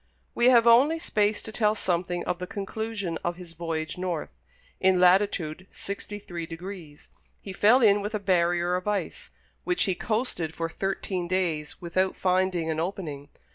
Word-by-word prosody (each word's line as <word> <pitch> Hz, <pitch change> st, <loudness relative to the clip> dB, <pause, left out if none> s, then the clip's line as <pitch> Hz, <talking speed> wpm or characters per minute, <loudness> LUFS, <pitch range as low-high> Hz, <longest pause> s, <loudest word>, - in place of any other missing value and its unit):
We 240 Hz, -, +3 dB
have 240 Hz, -2 st, +6 dB
only 260 Hz, +8 st, +6 dB
space 210 Hz, -9 st, 0 dB
to 220 Hz, -, -6 dB
tell 215 Hz, -1 st, +2 dB
something 175 Hz, -2 st, -1 dB
of 180 Hz, 0 st, -2 dB
the 180 Hz, -, -5 dB
conclusion 205 Hz, -3 st, -4 dB
of 175 Hz, 0 st, -1 dB
his 175 Hz, -2 st, -10 dB
voyage 160 Hz, 0 st, -4 dB
north. 180 Hz, -4 st, -3 dB, 0.5 s
In 185 Hz, -1 st, +3 dB
latitude 180 Hz, -2 st, +2 dB
sixty 200 Hz, +1 st, -6 dB
three 175 Hz, -5 st, -7 dB
degrees, 165 Hz, -3 st, -9 dB, 0.3 s
he 195 Hz, -, -8 dB
fell 220 Hz, +7 st, +5 dB
in 205 Hz, -1 st, +5 dB
with 210 Hz, +2 st, -3 dB
a -, -, -1 dB
barrier 175 Hz, -2 st, +1 dB
of 180 Hz, +2 st, -4 dB
ice, 210 Hz, -1 st, -2 dB, 0.3 s
which 360 Hz, -, +1 dB
he 195 Hz, -, +1 dB
coasted 180 Hz, -6 st, -2 dB
for 165 Hz, 0 st, -2 dB
thirteen 190 Hz, 0 st, -3 dB
days 170 Hz, -5 st, -1 dB
without 185 Hz, +2 st, 0 dB
finding 185 Hz, -2 st, +1 dB
an 155 Hz, -, -2 dB
opening. 160 Hz, -5 st, -4 dB
185 Hz, 165 wpm, -27 LUFS, 170-205 Hz, 0.5 s, have